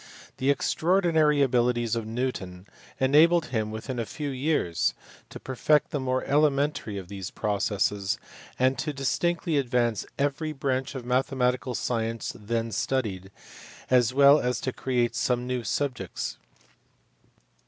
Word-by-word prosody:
The 130 - 0
extraordinary 160 -1 +3
abilities 120 -2 +1
of 115 -2 -3
Newton 110 -7 -4 0.3
enabled 160 +5 +4
him 110 -2 0
within 115 +4 -5
a 115 - -1
few 150 -2 -4
years 130 - 0 0.3
to - - -9
perfect 150 +5 +1
the 150 - -1
more 130 -1 -1
elementary 140 -6 +1
of 95 -2 -7
those 95 -1 -6
processes, 100 -1 -1 0.4
and 130 +1 +2
to 150 +2 -2
distinctly 165 +4 0
advance 120 -4 0
every 145 +3 -1
branch 135 -1 -2
of 125 -2 -6
mathematical 125 0 0
science 115 -1 -2
then 115 +1 -3
studied, 100 -5 -2 0.6
as 125 -2 +4
well 140 +2 +6
as 125 0 -1
to 130 - -2
create 125 -2 0
some 125 -1 0
new 125 -1 -2
subjects. 95 - -3
125 Hz, 130 wpm, -27 LUFS, 115-140 Hz, 0.6 s, well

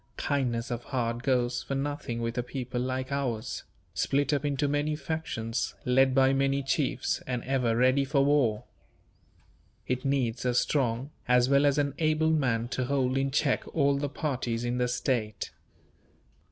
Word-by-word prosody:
Kindness 125 -4 -1
of 120 0 -4
heart 120 -3 -2
goes 125 -2 +1
for 135 - -4
nothing 135 -4 -3
with 115 0 -2
a 125 - 0
people 125 0 -4
like 130 +1 -3
ours; 125 -6 -2 0.3
split 140 +1 +1
up 145 - 0
into 145 0 0
many 145 +1 0
factions, 140 -7 -3
led 130 +1 +4
by 135 0 +5
many 135 0 +1
chiefs, 135 +1 0
and 125 -2 -2
ever 125 -4 +1
ready 130 +3 +4
for 140 0 +2
war. 135 -7 +2 1.2
It 125 0 -2
needs 130 -4 0
a 125 -1 0
strong, 130 0 +1 0.2
as 125 0 +4
well 140 +1 +5
as 140 0 +2
an 140 -2 +1
able 160 0 +2
man 125 -7 +1
to 130 -1 -1
hold 130 -1 +1
in 135 0 +1
check 145 0 +1
all 140 -3 +3
the 140 +1 -2
parties 125 -5 -2
in 120 +1 -1
the 125 - +2
state. 120 -4 -2
130 Hz, 165 wpm, -28 LUFS, 120-140 Hz, 1.2 s, by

